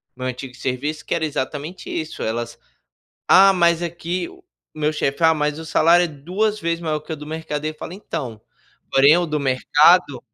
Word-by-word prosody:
no 130 - -8
meu - - -1
antigo 125 0 -7
serviço 145 +5 -4
que - - -2
era 165 -1 0
exatamente 150 +4 -5
isso, 160 -1 -4
elas: 115 +1 -3 0.7
"Ah, 195 +1 +7
mas 170 -2 +2
aqui 170 - -4
o 370 -1 -18 0.3
meu 155 0 -1
chefe, 150 +2 -2
ah, 160 - +6
mas 150 -1 -1
o 160 - -8
salário 170 +2 +4
é - - 0
duas 185 +9 -2
vezes 170 -2 -1
maior 155 -2 -2
que 155 +2 -11
o - - -2
do 150 - -9
mercado." 155 -1 -4
Eu 155 - -2
fala: 165 - -8
"Então, 140 - -6 0.5
porém 140 +5 +6
o 175 - 0
do 155 -2 -2
mercado" 140 +3 +3
155 Hz, 195 wpm, -21 LUFS, 145-170 Hz, 0.7 s, Ah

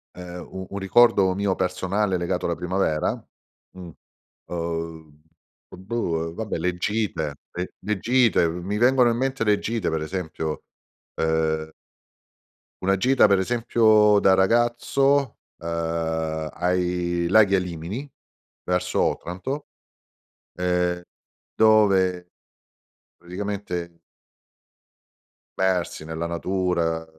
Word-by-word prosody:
Ehm, 90 0 -8
u 95 0 -6
un 100 - -4
ricordo 95 -1 +4
mio 100 0 0
personale 95 +2 0
legato 90 +1 -2
alla 85 - 0
primavera? 90 -3 0 0.6
Mh, 90 -2 -10 0.6
uhm, 80 -3 -5 0.5
uhm, 95 - -13
boh, 85 -8 -1
uhm, 80 - -7
vabbè 110 -2 -3
le 90 +2 -1
gite, 95 -6 -2 0.2
le 90 +1 -5
le 105 -2 -2
gite 120 -8 +3
mi 90 +5 -4
vengono 125 +1 +4
in 115 - 0
mente 130 -1 -1
le 105 -1 +4
gite 115 -4 -2
per 80 -1 -2
esempio, 80 -2 -4 0.5
ehm 80 -1 0 1.1
una 95 +1 +2
gita 130 +3 +4
per 100 -1 +4
esempio 110 -1 +4
da 95 - +5
ragazzo, 120 +6 +2 0.2
ehm, 80 -1 -2
ai 90 -1 0
laghi 100 +1 +5
Alimini 90 - -3 0.5
verso 90 0 0
Otranto, 130 - -3 0.9
ehm, 90 -1 0 0.5
dove 95 -5 +3 0.8
praticamente 90 -2 -5 1.6
persi 90 -4 0
nella 80 +1 -4
natura 85 -2 -1
90 Hz, 105 wpm, -24 LUFS, 85-105 Hz, 1.6 s, da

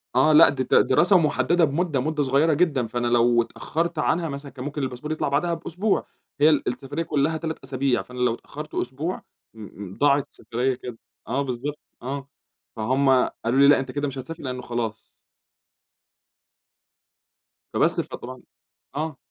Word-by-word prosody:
آه، 135 +5 +5
لأ، 155 +2 +8
دي 135 -2 -1
د - - -10 0.2
دراسة 180 +9 +5
محددة 160 +1 +2
بمدة، 155 0 0
مدة 150 +2 0
صغيّرة 140 +4 +3
جدًا. 145 -6 +1
فأنا 120 +2 -2
لو 120 0 +4
اتأخرت 165 +7 -3
عنها 165 +2 +1
مثلًا 140 0 -7
كان 130 0 -8
ممكن 145 0 -4
الباسبور 130 +3 -4
يطلع 155 - -1
بعدها 170 +5 +1
بأسبوع، 175 +5 -1 0.3
هي 150 +2 +6
ال 150 -3 +1
السفرية 135 +5 -3
كلّها 155 +1 0
3 160 0 -4
أسابيع 130 -1 0
فأنا 125 0 -10
لو 125 -2 +2
اتأخرت 150 +5 -9
أسبوع، 145 +9 -3 0.3
م 110 - -12 0.3
م - - -14
ضاعت 145 0 +3
السفرية 125 +3 -2
كده. 125 -1 -8 0.3
آه 130 +5 0
بالضبط، 140 +2 -4 0.2
آه. 135 +2 -5 0.5
فهُم 130 +5 +1 0.4
قالوا 120 +4 +2
لي: 140 - +7
"لأ، 145 - +6
أنت 130 -1 -4
كده 145 +2 -2
مش 135 -1 -6
هتسافر 160 +6 -7
لأنّه 125 -2 -4
خلاص." 115 -3 -4 2.7
فبَس - - +2
فطبعًا - - -9 0.5
آه. 155 -1 -3
140 Hz, 160 wpm, -24 LUFS, 125-155 Hz, 2.7 s, لأ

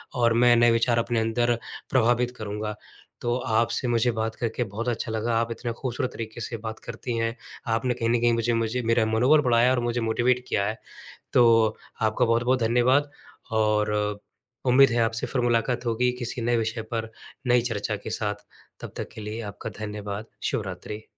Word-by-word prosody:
और 120 -2 +3
मैं 120 +1 +5
नए 120 0 +5
विचार 115 +1 +2
अपने 115 0 0
अंदर 120 +2 +1 0.3
प्रभावित 120 0 +2
करूँगा 105 0 -4 0.5
तो 120 0 0
आपसे 115 +3 +1
मुझे 120 0 +2
बात 110 0 -2
करके 120 +1 -2
बहुत 110 +2 -5
अच्छा 115 -1 -3
लगा। 110 +1 -1
आप 115 0 -2
इतने 120 +1 -4
खूबसूरत 125 +1 -3
तरीक़े 115 +1 -6
से 115 +1 -4
बात 110 0 -5
करती 120 -2 -4
हैं, 115 0 -1 0.3
आपने 115 +2 +1
कहीं 115 -1 -1
न 120 0 +3
कहीं 120 0 +4
मुझे 115 +1 +1
मुझे 115 +2 0
मेरा 115 0 +3
मनोबल 125 +8 +4
बढ़ाया 125 -2 +4
और 130 - +2
मुझे 120 0 -1
मोटिवेट 120 +2 +1
किया 100 - +1
है। 110 +3 -2 0.6
तो 115 -2 +5 0.3
आपका 110 +3 +2
बहुत-बहुत 125 +2 +2
धन्यवाद 125 +5 +3 0.4
और 105 -1 +2 0.8
उम्मीद 130 +2 +6
है 120 0 +1
आपसे 115 0 -2
फिर 125 - -1
मुलाकात 120 +1 +1
होगी 120 +2 +1
किसी 120 0 -4
नए 120 +1 +2
विषय 110 0 -1
पर 115 -1 -2 0.4
नई 120 0 +5
चर्चा 105 0 -2
के - - -4
साथ 105 -1 -3 0.3
तब - - -8
तक - - -4
के - - -8
लिए 105 +2 -5
आपका 100 - -7
धन्यवाद। 105 0 -5 0.2
शुभरात्रि। 105 +1 -4
115 Hz, 180 wpm, -25 LUFS, 110-120 Hz, 0.8 s, उम्मीद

